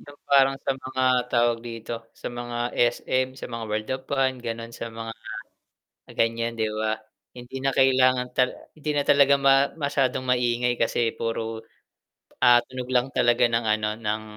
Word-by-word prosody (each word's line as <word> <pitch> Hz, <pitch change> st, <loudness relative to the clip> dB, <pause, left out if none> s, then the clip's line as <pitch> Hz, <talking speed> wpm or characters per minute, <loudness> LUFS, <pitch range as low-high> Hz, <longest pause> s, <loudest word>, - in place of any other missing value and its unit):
'Yung 145 Hz, 0 st, -14 dB
parang 135 Hz, -1 st, +5 dB
sa 135 Hz, -, 0 dB
mga, 130 Hz, 0 st, -3 dB, 0.3 s
tawag 120 Hz, -1 st, +3 dB
dito, 115 Hz, 0 st, -6 dB
sa -, -, -6 dB
mga 120 Hz, 0 st, -5 dB, 0.2 s
SM, 130 Hz, +2 st, +1 dB
sa -, -, -7 dB
mga 115 Hz, -1 st, -5 dB
World 105 Hz, 0 st, -3 dB
of 130 Hz, -, -15 dB
Fun 135 Hz, -2 st, +1 dB
ganun, 115 Hz, -1 st, -5 dB
sa 115 Hz, -, -6 dB
mga 115 Hz, 0 st, -6 dB, 1.0 s
ganiyan, 115 Hz, 0 st, 0 dB
'di 110 Hz, -1 st, 0 dB
ba? 110 Hz, 0 st, -1 dB, 0.4 s
Hindi 125 Hz, +2 st, -8 dB
na 135 Hz, -, +2 dB
kailangan 130 Hz, -1 st, +4 dB
ta 125 Hz, -, +4 dB, 0.3 s
hindi 155 Hz, 0 st, -4 dB
na 145 Hz, -1 st, 0 dB
talaga 140 Hz, 0 st, +5 dB
ma 135 Hz, 0 st, +4 dB
masyadong 140 Hz, -4 st, 0 dB
maingay 120 Hz, -1 st, +1 dB
kasi 115 Hz, 0 st, +1 dB
puro, 115 Hz, -1 st, -3 dB, 0.8 s
ah, 120 Hz, 0 st, +7 dB
tunog 130 Hz, -1 st, -6 dB
lang 125 Hz, +1 st, +2 dB
talaga 120 Hz, 0 st, +3 dB
ng 115 Hz, 0 st, 0 dB
ano 110 Hz, -1 st, +1 dB
ng 110 Hz, -1 st, -2 dB
120 Hz, 165 wpm, -25 LUFS, 115-130 Hz, 1.0 s, ah